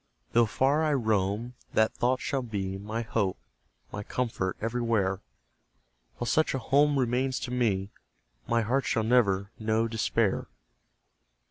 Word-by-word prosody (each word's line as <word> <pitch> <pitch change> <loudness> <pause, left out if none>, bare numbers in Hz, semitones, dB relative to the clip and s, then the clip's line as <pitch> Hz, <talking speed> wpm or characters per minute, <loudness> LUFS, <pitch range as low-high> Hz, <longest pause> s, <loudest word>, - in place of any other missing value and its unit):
Though 120 -1 +4
far 135 +8 +2
I 155 -2 +2
roam, 110 0 0 0.2
that 110 0 +3
thought 125 +1 +1
shall 135 - -1
be 100 -5 -3
My 110 +3 -3
hope, 105 - -1 0.5
my 100 - -4
comfort 105 -4 -2
everywhere; 115 -4 0 1.0
While - - -3
such 155 +3 +2
a - - +1
home 140 +3 +3
remains 130 +1 +1
to 125 - -4
me, 105 -6 0 0.6
My 115 -1 +2
heart 130 +4 0
shall 110 - +1
never 100 -4 +2
know 110 +1 +1
despair. 110 -2 0
115 Hz, 135 wpm, -28 LUFS, 105-125 Hz, 1.0 s, Though